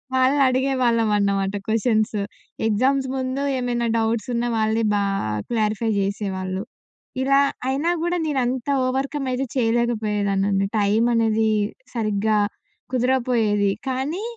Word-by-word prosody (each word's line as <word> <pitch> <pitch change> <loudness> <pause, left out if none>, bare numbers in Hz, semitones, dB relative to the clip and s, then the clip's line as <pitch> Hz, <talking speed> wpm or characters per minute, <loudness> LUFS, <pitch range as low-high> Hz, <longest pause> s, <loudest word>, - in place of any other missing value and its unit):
వాళ్ళనడిగేవాళ్ళం 260 -3 +2
అన్నమాట 200 -1 0
questions. 220 0 +1 0.5
Exams 260 +5 +2
ముందు 260 +1 -2 0.2
ఏమైనా 240 -1 -1
డౌట్స్ 225 -1 0
ఉన్న 235 0 0
వాళ్ళే 220 +1 +1
బా 205 - +2 0.5
క్లారిఫై 220 -1 0
జేసేవాళ్ళు. 195 -1 -2 0.6
ఇలా 275 +1 +4 0.3
అయినా 275 +5 0
గూడా 345 +1 0
నేనంత 260 -4 -1 0.2
ఓవర్‌కం 270 +2 -2
అయితే 255 +2 -1
చేయలేకపోయేదాన్నండి. 210 -5 +1
టైమనేది 220 +1 +2 0.5
సరిగ్గా 215 -2 0 0.6
కుదరపోయేది. 240 -5 +2 0.2
కానీ 275 +9 -2
230 Hz, 95 wpm, -22 LUFS, 210-260 Hz, 0.6 s, ఇలా